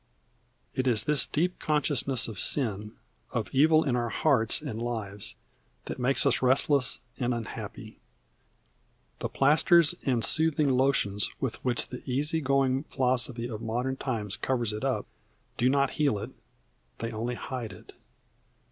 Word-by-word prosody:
It 130 0 -1
is 115 -4 +2
this 150 -1 +2
deep 180 +4 -1
consciousness 145 -4 +1
of 110 -4 -7
sin, 105 -6 +1 0.4
of 110 -5 -3
evil 155 +4 +5
in 130 -4 0
our 120 -1 -1
hearts 120 -5 +2
and 125 -7 -6
lives, 110 -4 -4 0.5
that - - -6
makes 130 +2 +3
us - - +2
restless 130 +1 +2 0.2
and 125 -1 0
unhappy. 115 -2 -7 1.2
The - - -3
plasters 155 +3 +4
and 125 -4 +2
soothing 155 -3 +2
lotions 125 -6 +2
with 130 -5 -4
which 125 -2 +1
the 125 - -7
easy 150 +5 +1
going 135 0 +1
philosophy 125 -3 -1
of 110 -2 -6
modern 120 +4 -2
times 110 -7 -3
covers 120 -5 -1
it 105 - -5
up, - - -1 0.5
do 125 - +2
not 140 0 +2
heal 145 -7 +1
it; - - -6 0.7
they 115 0 -4
only 115 +3 -3
hide 120 -3 -5
it. 90 - -14
130 Hz, 145 wpm, -28 LUFS, 115-140 Hz, 1.2 s, evil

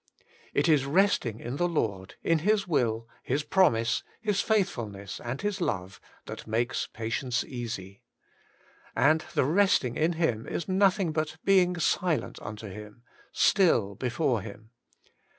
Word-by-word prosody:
* - - -28
It - - +3
is 145 -4 +3
resting 145 - +2
in 120 +4 -5
the 175 - +2
Lord, 100 - -2
in 165 -1 +2
His 200 +3 +1
will, 115 -8 0
His 140 +4 -1
promise, 115 -10 +2 0.2
His 210 -3 0
faithfulness, 115 - -2
and 120 +3 -4
His 205 -2 -2
love, 95 - -3 0.2
that - - -8
makes 120 +3 -1
patience 115 +3 -2
easy. 115 -4 -6 0.9
And 155 +5 +4
the - - +3
resting 165 -6 +2
in 160 +3 +2
Him 160 -10 -1
is 170 - -3
nothing 190 -2 +2
but 155 0 -2
being 180 -2 +4
silent 170 -4 0
unto 105 +1 -7
Him, 105 +3 -10 0.3
still 120 - +3
before 120 +1 0
Him. 110 +2 -11
130 Hz, 140 wpm, -28 LUFS, 110-175 Hz, 0.9 s, And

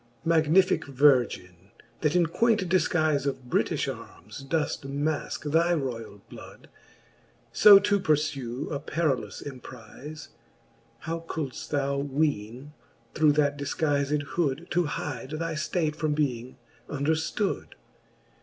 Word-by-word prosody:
Magnificke 165 +3 +3
Virgin, 125 - +2 0.3
that 150 +1 0
in 175 -1 +4
queint 215 +3 +1
difguife 155 -5 +1
Of 135 -2 -3
Britifh - - 0
armes - - -12
doeft 150 +2 -1
maske 145 +1 -3
thy 170 +2 +3
royall 115 -8 -5
blood, - - -13 0.8
So 205 - +9
to 200 +1 +2
purfue 145 -6 -1
a 140 - -2
perillous 150 -4 -2
emprize. 130 +3 -10 0.7
How 165 +1 -3
coiilft 145 -5 -5
thou 140 -1 0
weene, 140 -2 -2 0.4
through 155 -1 +4
that 145 -1 +1
difguized 145 0 0
hood^ 165 0 -1
To 175 0 +2
hide 145 -2 -5
thy 165 0 -3
ftate 155 0 -1
from 155 -1 -1
being 130 -4 -2 0.3
underftood 160 +7 -1
150 Hz, 115 wpm, -27 LUFS, 135-160 Hz, 0.8 s, So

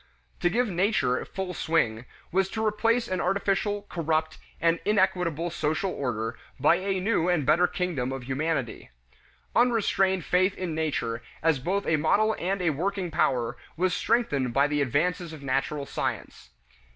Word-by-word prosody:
To 175 - +2
give 240 +6 +1
"nature" 180 - +1
full 190 -1 -5
swing 125 -9 0 0.3
was 190 +1 +2
to 220 +1 -2
replace 230 +3 +1
an 185 -4 -1
artificial, 200 +1 0
corrupt, 160 -4 -1 0.2
and 165 0 +2
inequitable 180 -5 +1
social 160 +3 -1
order 115 -5 -3 0.2
by 150 +5 +5
a 190 +1 -1
new 185 -3 +1
and 170 -6 +1
better 165 +5 +4
kingdom 165 -10 -2
of 135 -1 -5
humanity. 135 -1 -2 0.7
Unrestrained 195 -7 +2
faith 185 +2 +2
in 180 -3 -3
Nature 150 -7 -2 0.2
as 160 -4 +3
both 195 +9 -1
a 160 - +2
model 215 +8 +2
and 190 +1 -1
a 165 - +3
working 180 +3 -2
power 130 -7 +1 0.2
was 180 +1 +1
strengthened 145 - 0
by 140 +1 +5
the 145 0 0
advances 160 +6 0
of 150 -3 -10
natural 140 +2 -1
science. - - -4
170 Hz, 150 wpm, -27 LUFS, 145-195 Hz, 0.7 s, by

